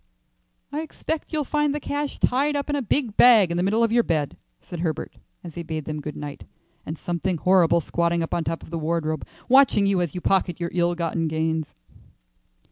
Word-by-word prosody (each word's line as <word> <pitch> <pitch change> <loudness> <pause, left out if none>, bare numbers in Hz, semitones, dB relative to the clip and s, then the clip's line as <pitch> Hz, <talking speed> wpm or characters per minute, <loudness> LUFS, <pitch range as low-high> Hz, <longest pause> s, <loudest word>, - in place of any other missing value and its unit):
"I 295 +2 -2
expect 320 0 -5
you'll 305 -2 0
find 295 +1 0
the - - -2
cash 290 0 -3
tied 285 +4 +2
up 285 +1 -2
in - - +1
a 285 - 0
big 240 -2 -1
bag 220 -8 +7
in 170 - -1
the - - +1
middle 210 +5 +2
of 230 - +2
your 235 +1 +5
bed," 155 -9 -1 0.2
said 175 - -9
Herbert, 160 -2 -3 0.3
as 170 -3 -8
he 170 - -5
bade 160 -3 -5
them 155 -1 -4
good 150 +1 -6
night, 145 -1 -7 0.4
"and 155 - -4
something 175 +2 -2
horrible 170 -1 +4
squatting 170 +1 0
up 165 - -5
on 170 - 0
top 165 +1 -3
of - - -13
the 165 - -3
wardrobe 155 -1 -2 0.2
watching 260 -6 +5
you 195 -2 +2
as 175 -2 -3
you - - -2
pocket 185 -3 +1
your 170 -1 -3
ill 175 0 +1
gotten 165 -1 -1
gains." 160 0 -2
175 Hz, 210 wpm, -24 LUFS, 160-240 Hz, 0.4 s, bag